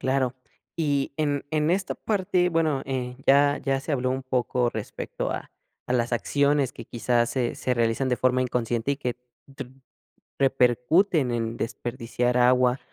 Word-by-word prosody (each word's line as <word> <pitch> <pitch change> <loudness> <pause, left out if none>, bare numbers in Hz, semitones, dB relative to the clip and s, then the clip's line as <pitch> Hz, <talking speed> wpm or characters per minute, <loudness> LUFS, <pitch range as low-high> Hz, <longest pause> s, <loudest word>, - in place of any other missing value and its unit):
Claro, 130 -1 0 0.4
y 145 -4 0
en 145 -2 0
en 155 0 +1
esta 190 +2 0
parte 185 -4 0
bueno, 160 -5 +1
eh, 125 -2 -3
ya 145 +1 +5
ya 135 -1 0
se 150 - -4
habló 130 -2 0
un 130 +1 -2
poco 125 -1 0
respecto 110 -2 -5
a - - -5 0.4
a - - 0
las 120 -1 0
acciones 140 +2 +1
que, - - -9
quizás, 120 0 0
se 125 -3 -1
se 125 - -1
realizan 115 +2 +1
de 125 - +1
forma 130 0 +2
inconsciente, 120 0 -1
y - - -3
que 125 -3 -3 0.4
tu 130 -2 -7 0.7
repercuten 135 - +3
en 115 -1 -2
desperdiciar 120 +1 -2
agua 125 +1 +4
130 Hz, 160 wpm, -25 LUFS, 120-145 Hz, 0.7 s, ya